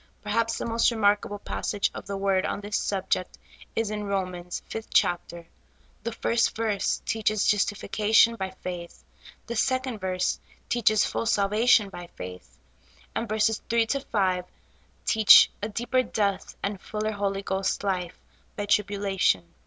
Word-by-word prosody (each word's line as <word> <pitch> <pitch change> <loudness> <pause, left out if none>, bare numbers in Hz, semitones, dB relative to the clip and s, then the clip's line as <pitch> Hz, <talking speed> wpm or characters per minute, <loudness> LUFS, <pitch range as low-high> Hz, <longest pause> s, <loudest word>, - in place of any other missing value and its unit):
Perhaps 230 +2 0
the - - -4
most 230 0 +2
remarkable 205 -2 +1
passage 205 0 -2
of - - -8
the 200 - -3
Word 195 -1 +1
on - - -2
this 205 0 -4
subject 190 -2 -1 0.4
is 225 -2 0
in 210 -1 -3
Romans, 185 -3 -3
fifth 225 0 -7
chapter; 170 -1 +1 0.6
the 230 - -3
first 230 +1 +1
verse 220 -3 -1
teaches 215 -2 0
justification 210 +2 +3
by 190 -4 -3
faith, 175 -1 -7 0.4
the 235 - -5
second 260 -1 0
verse 185 -1 -1 0.3
teaches 215 -3 +3
full 230 - -2
salvation 210 +1 +3
by 175 -2 -9
faith, 90 -9 -9 0.6
and 225 -1 -3
verses 215 0 +1
three 230 0 +3
to 275 +5 -1
five 190 -8 0 0.6
teach 220 -2 +7
a 210 - -2
deeper 240 +4 0
death 205 -5 -2
and 200 -1 -3
fuller 215 0 -3
Holy 200 -1 -2
Ghost 190 +1 -1
life 180 -3 -2 0.4
by 205 - -3
tribulation. 195 - +1
205 Hz, 145 wpm, -26 LUFS, 190-225 Hz, 0.6 s, teach